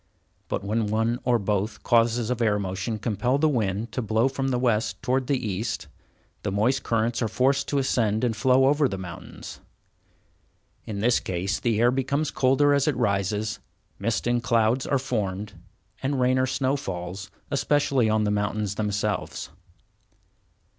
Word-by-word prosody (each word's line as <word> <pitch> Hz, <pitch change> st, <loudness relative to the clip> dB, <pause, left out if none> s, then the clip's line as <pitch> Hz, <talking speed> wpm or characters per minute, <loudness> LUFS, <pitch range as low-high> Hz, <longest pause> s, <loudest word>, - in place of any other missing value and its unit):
But -, -, -3 dB
when 110 Hz, +2 st, 0 dB
one 115 Hz, +3 st, 0 dB
or 125 Hz, -2 st, +4 dB
both 105 Hz, +1 st, -2 dB
causes 115 Hz, 0 st, +2 dB
of 125 Hz, -1 st, -2 dB
air 105 Hz, -3 st, +3 dB
motion 95 Hz, +3 st, -3 dB
compel 120 Hz, +4 st, 0 dB
the 155 Hz, +2 st, +3 dB
wind 110 Hz, -5 st, -1 dB
to 125 Hz, -, -2 dB
blow 110 Hz, +2 st, +2 dB
from 135 Hz, 0 st, -2 dB
the 130 Hz, -2 st, +1 dB
west 120 Hz, -3 st, 0 dB
towards 130 Hz, 0 st, 0 dB
the 140 Hz, -, +2 dB
east, 110 Hz, -2 st, -3 dB, 0.6 s
the 100 Hz, -, -2 dB
moist 120 Hz, +7 st, +1 dB
currents 115 Hz, +1 st, 0 dB
are 115 Hz, -, +1 dB
forced 135 Hz, +5 st, +1 dB
to 145 Hz, -, 0 dB
ascend 115 Hz, -5 st, +1 dB
and 120 Hz, -3 st, +1 dB
flow 130 Hz, +5 st, +4 dB
over 145 Hz, 0 st, +3 dB
the 95 Hz, -, -4 dB
mountains. 90 Hz, -1 st, -9 dB, 1.3 s
In 100 Hz, -2 st, -4 dB
this 120 Hz, +2 st, +3 dB
case 95 Hz, +2 st, -2 dB
the 115 Hz, -3 st, 0 dB
air 120 Hz, +1 st, +5 dB
becomes 140 Hz, +3 st, 0 dB
colder 135 Hz, +2 st, +3 dB
as 140 Hz, 0 st, +2 dB
it 145 Hz, -5 st, +1 dB
rises, 105 Hz, -1 st, 0 dB, 0.4 s
mist 110 Hz, +1 st, -1 dB
and 120 Hz, 0 st, +1 dB
clouds 115 Hz, +2 st, +2 dB
are 140 Hz, -, +2 dB
formed, 105 Hz, -6 st, -3 dB, 0.5 s
and 135 Hz, 0 st, -1 dB
rain 130 Hz, +1 st, +3 dB
or 130 Hz, -, +2 dB
snow 130 Hz, +1 st, 0 dB
falls, 90 Hz, -6 st, -5 dB, 0.2 s
especially 140 Hz, -3 st, +2 dB
on 110 Hz, 0 st, +2 dB
the 105 Hz, -, +1 dB
mountains 105 Hz, 0 st, -1 dB
themselves. 105 Hz, -3 st, -2 dB
115 Hz, 165 wpm, -25 LUFS, 105-130 Hz, 1.3 s, air